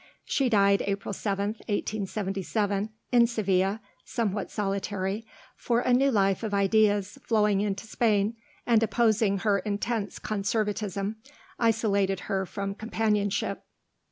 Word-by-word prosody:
She 270 -3 +1
died 200 -2 +4
April 200 0 -2
7th, 200 +2 -2
1877, 200 0 -1 0.2
in 240 -1 +6
Seville, 195 -3 +1 0.3
somewhat 210 -4 -2
solitary, 200 +1 -2 0.3
for 240 0 0
a 250 - +2
new 270 +3 +4
life 195 -5 +2
of 215 -3 -2
ideas 205 +3 +2
flowing 210 -4 +2
into 205 +1 -2
Spain, 215 -1 +1 0.3
and 230 -2 +4
opposing 220 -3 +2
her 205 -2 +2
intense 205 +2 -2
conservatism, 210 -1 -2 0.4
isolated 200 -5 +1
her 190 -1 -2
from 195 +1 -4
companionship. 210 -2 -1
205 Hz, 115 wpm, -27 LUFS, 195-220 Hz, 0.4 s, in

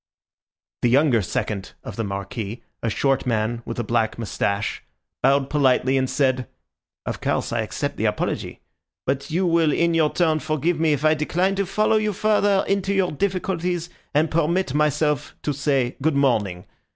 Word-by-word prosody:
The 120 - +3
younger 130 -2 +4
second 100 +1 -3
of 110 - -7
the 115 - -2
Marquis, 100 +3 -5 0.2
a 115 - 0
short 135 +4 +1
man 115 0 0
with 115 - -5
a 120 - -1
black 110 0 0
moustache, 100 -2 -2 0.4
bowed 135 +1 +3
politely, 135 -2 +2
and 130 -1 +1
said— 130 -3 +1 0.6
"Of - - -4
course, - - -1
I - - +1
accept - - -3
the - - -1
apology; - - -2 0.4
but 135 +1 -1
you 175 +4 +1
will 165 -3 +3
in 170 +3 +2
your 160 -2 +3
turn 160 -3 +2
forgive 155 +2 -1
me 160 -2 +3
if 145 +1 -1
I 155 - +6
decline 175 +5 0
to 195 -1 -1
follow 215 +3 +2
you 215 -1 0
further 205 -1 +2
into 195 0 0
your 190 -2 +2
difficulties, 180 0 -2 0.2
and 155 +1 +2
permit 165 -1 +1
myself 150 -1 +1
to 150 - 0
say 135 -3 0
good 155 +1 +1
morning! 110 -10 +1
150 Hz, 170 wpm, -23 LUFS, 120-170 Hz, 0.6 s, I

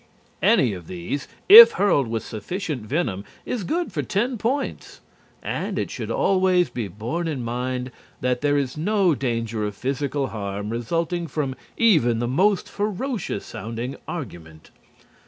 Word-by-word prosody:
Any 170 - +4
one 95 - -4
of 85 - -17
these, 90 +11 -4 0.2
if 460 +4 +12
hurled 175 - +2
with 115 0 -3
sufficient 145 - -4
venom, 110 - -2 0.2
is 235 -5 -3
good 340 - -2
for - - -1
ten 225 +4 -1
points. 265 +6 -3 0.4
And - - -3
it - - -2
should - - -5
always 185 -5 +2
be 120 -4 -3
borne 115 - -4
in 140 -6 -3
mind 125 +2 -3 0.3
that 125 -1 0
there 145 0 +2
is 135 -3 -1
no 190 +2 +2
danger 115 -5 -2
of 105 -1 -3
physical 135 +3 -2
harm 100 0 -4
resulting 165 +9 -2
from 140 -2 -2 0.2
even 155 - +4
the 120 +1 -1
most 190 +10 +2
ferocious 210 - -3
sounding 115 +5 -5
argument. 85 - -8
135 Hz, 150 wpm, -23 LUFS, 115-185 Hz, 0.4 s, if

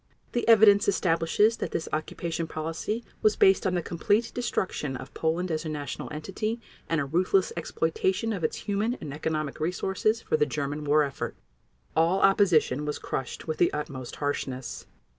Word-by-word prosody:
The 240 - -1
evidence 210 -2 +7
establishes 185 +4 +2
that - - -3
this 165 - -3
occupation 165 +2 -2
policy 165 +9 -3 0.2
was 215 -1 +4
based 190 0 +4
on 180 - 0
the 175 - 0
complete 205 +8 +1
destruction 185 - -2
of - - -10
Poland 165 +3 -1
as 155 0 -1
a 160 - -4
national 145 -2 -5
entity, 195 +9 -3 0.3
and 165 - +2
a 140 - 0
ruthless 180 +6 +2
exploitation 185 +6 0
of 185 -5 -4
its 155 - 0
human 210 +4 0
and 145 - -7
economic 155 -1 -2
resources 190 +6 0
for 155 - 0
the 150 - +2
German 145 +1 -3
war 150 +1 +4
effort. 140 -2 -4 0.6
All 170 +4 +3
opposition 180 -8 +4
was 150 0 -2
crushed 135 - -5
with 155 - -2
the 175 - +4
utmost 135 -4 -5
harshness. 135 -3 -3
165 Hz, 165 wpm, -27 LUFS, 150-200 Hz, 0.6 s, evidence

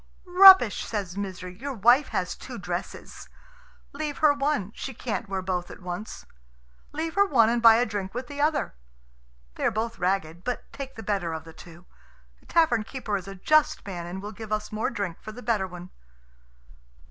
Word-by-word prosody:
"Rubbish!" 370 - +8
says 195 -5 -4
Misery; 185 -2 -6
"your 275 +1 -5
wife 240 +7 +4
has - - -2
two - - -9
dresses. - - -6 0.6
Leave 295 0 -4
her 305 -2 +5
one; 285 -8 -1
she 265 - -7
can't 220 -3 -4
wear 190 -1 -3
both 180 -1 -2
at - - -11
once. 180 +3 -7 0.7
Leave 320 +2 -3
her 400 0 +4
one, 230 - +4
and 235 0 0
buy 230 -1 +8
a 240 +2 +3
drink 205 -2 -5
with 250 +1 -3
the 285 +2 -6
other. 300 - +1 0.8
They - - -7
are - - +4
both 230 +2 -3
ragged, 180 -2 -1
but 250 - -3
take 270 -1 -7
the 225 - -8
better 195 -5 -1
of 160 0 -5
the 165 0 -13
two. 170 +1 -14 0.5
The - - -25
tavern 310 -10 +3
keeper 225 -3 -4
is 190 -1 -4
a 195 - -7
just 305 +10 +2
man, 175 -4 -6
and 190 +3 -7
will 210 - -6
give 220 -1 -10
us 215 0 -2
more 215 +1 -1
drink 200 -7 -4
for 215 - -8
the 245 +3 -11
better 215 -4 0
one." 180 0 -10
215 Hz, 195 wpm, -26 LUFS, 190-265 Hz, 0.8 s, Rubbish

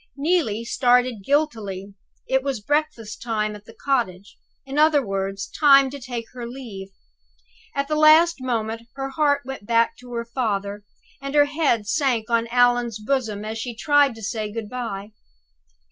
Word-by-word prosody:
Neelie 280 - 0
started 245 -3 +2
guiltily. 210 -9 -1 0.3
It 265 0 +2
was 270 -3 -2
breakfast 290 -2 -2
time 215 -2 -1
at 205 0 -13
the 225 - -14
cottage 210 -8 -1 0.3
in 275 +2 -2
other 300 -3 +4
words, 195 0 -3
time 275 -2 +5
to 285 - -7
take 245 -3 -5
leave. 235 -5 -7 0.9
At 280 0 -1
the 305 - 0
last 310 +3 +6
moment 230 -2 -3
her 270 0 -4
heart 285 0 +1
went 265 -6 -8
back 230 0 +2
to 250 0 -13
her 235 0 -3
father; 205 -4 -2 0.4
and 275 +1 -5
her 290 -1 +6
head 290 -7 0
sank 240 -2 0
on 230 0 +2
Allan's 245 -1 +2
bosom 215 -3 -2
as 220 +1 -4
she 240 0 -5
tried 285 0 +3
to 225 - -11
say, 215 0 -3
Good 220 -1 -5
by. 220 -4 -5
240 Hz, 160 wpm, -23 LUFS, 215-275 Hz, 0.9 s, last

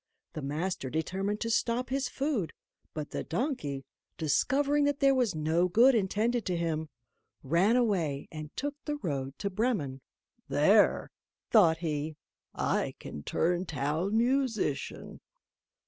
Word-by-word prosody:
The 155 - -5
master 150 +1 -2
determined 190 +8 -2
to 230 - -1
stop 240 +3 0
his 265 -1 0
food, 270 - -1 0.4
but 150 -2 -5
the - - -3
donkey, 160 - -2 0.3
discovering 280 - +2
that 285 -1 0
there 275 0 +5
was 245 -9 +1
no 160 +3 +2
good 240 +9 +6
intended 225 +3 +1
to 180 -2 0
him, 160 -2 -2 0.5
ran 170 - +3
away 175 - +1
and 155 -1 -7
took 290 +1 -2
the 295 - -1
road 140 - -4
to 200 - -3
Bremen: 185 - -1 0.5
"There," 195 +9 +4 0.4
thought 175 -8 +6
he, 155 -2 -3 0.4
"I - - 0
can 75 - -8
turn 175 - 0
Town 160 - -1
Musician." 235 - -1
185 Hz, 130 wpm, -30 LUFS, 155-240 Hz, 0.5 s, good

